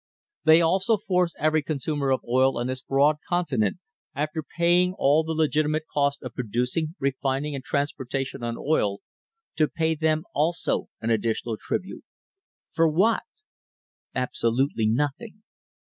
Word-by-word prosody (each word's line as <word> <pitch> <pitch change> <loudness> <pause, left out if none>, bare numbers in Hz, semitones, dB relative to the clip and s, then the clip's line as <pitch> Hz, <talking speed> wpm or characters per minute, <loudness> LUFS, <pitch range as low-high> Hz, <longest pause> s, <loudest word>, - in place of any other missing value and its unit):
They 160 +1 +7
also 190 +6 +2
force 180 -4 0
every 155 +1 +2
consumer 145 -1 -2
of 130 - +2
oil 130 +2 +3
on 120 - -1
this 130 0 -3
broad 140 +3 +3
continent, 140 - 0 0.4
after 150 +3 -2
paying 175 +4 +2
all 150 +3 +4
»e - - +1
legitimate 155 0 +1
cost 140 -1 +1
of 125 -3 -6
producing, 125 - -2
refining, 135 +1 -1
and 135 -2 -5
transportation 135 -2 -2
on 115 0 -3
oil, 105 -10 0 0.6
to 155 - +4
pay 160 +1 0
them 155 0 +1
also 160 +4 0
1 115 - -1
additional 115 +1 0
tribute 185 - -4 0.4
— - - -63
for 165 0 +4
what? 190 +9 +3 0.9
Absolutely 125 -1 0
nothing. 145 - -2
145 Hz, 135 wpm, -25 LUFS, 130-160 Hz, 0.9 s, They